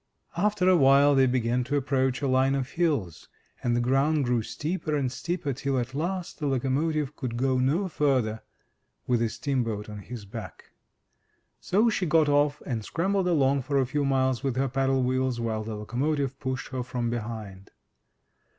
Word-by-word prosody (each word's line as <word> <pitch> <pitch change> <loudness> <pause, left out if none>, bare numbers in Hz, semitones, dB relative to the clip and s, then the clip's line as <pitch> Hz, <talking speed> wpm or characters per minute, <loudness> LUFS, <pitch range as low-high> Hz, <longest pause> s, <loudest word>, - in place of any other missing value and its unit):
After 200 +1 +1
awhile 140 -5 +6
they 135 -1 +4
began 125 0 +1
to 140 +3 -1
approach 130 -1 0
a - - +2
line 130 +1 +3
of 135 -1 -3
hills, 145 - -1 0.3
and 120 -1 +1
the - - +2
ground 135 +4 +2
grew 120 -1 +1
steeper 155 +6 -3
and 135 -4 0
steeper, 170 -1 -3
till 135 +1 -2
at 120 +1 -2
last 175 +5 -3
the 150 - -1
locomotive 140 +3 0
could 125 -5 -4
go 130 0 +1
no 150 +10 +1
further 130 -9 0 0.6
with 125 -2 +1
the 115 -1 +1
steamboat 115 -4 -2
on 105 -1 -7
his 110 +1 -8
back. 100 - -9 0.9
So 210 +5 +2
she 185 -4 -1
got 155 -1 +4
off 145 0 +2
and 115 -5 -3
scrambled 190 - 0
along 140 -5 +2
for 140 +2 -1
a 135 - +3
few 145 +3 -1
miles 130 -2 +1
with 135 -3 -1
her 135 +1 +1
paddle 135 0 +1
wheels 130 -1 0
while 110 -2 -2
the 110 0 -5
locomotive 135 +5 -2
pushed 130 0 -4
her 130 -1 -3
from 120 -1 -3
behind. 105 -4 -6
135 Hz, 175 wpm, -27 LUFS, 120-145 Hz, 0.9 s, awhile